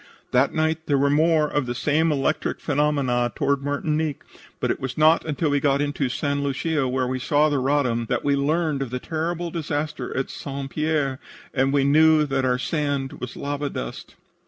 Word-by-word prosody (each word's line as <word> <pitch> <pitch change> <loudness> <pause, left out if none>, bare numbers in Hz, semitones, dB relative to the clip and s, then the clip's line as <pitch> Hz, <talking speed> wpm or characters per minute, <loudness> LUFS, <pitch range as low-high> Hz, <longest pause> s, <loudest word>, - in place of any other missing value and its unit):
"That 130 +2 +3
night 160 0 -1
there 145 - +3
were 140 +1 +2
more 155 +1 +3
of 145 -3 -1
the 120 - -3
same 155 +4 +2
electric 145 +2 -1
phenomena 140 -5 +1
toward 140 -2 +1
Martinique, 150 +1 -1 0.4
but - - 0
it - - -3
was 130 -1 -5
not 155 +2 +5
until 150 0 -1
we 145 - +2
got 140 0 +2
into 145 -2 -1
St. 140 +2 -1
Lucia, 140 +1 0
where 130 0 0
we 130 +1 -2
saw 145 +4 +2
the 145 -2 0
Roddam, 130 -4 +1
that - - -1
we 140 -1 +3
learned 150 +1 0
of 135 - -3
the 125 - -3
terrible 165 +4 -3
disaster 150 -5 -3
at 135 - -2
St. 135 -1 -6
Pierre, 150 -4 0 0.3
and 135 0 +2
then - - 0
we 140 -1 +3
knew 155 +2 +5
that 135 -2 0
our 125 -1 +2
sand 140 -1 -2
was 125 - -6
lava 145 0 -3
dust." - - -7
145 Hz, 195 wpm, -23 LUFS, 135-155 Hz, 0.4 s, not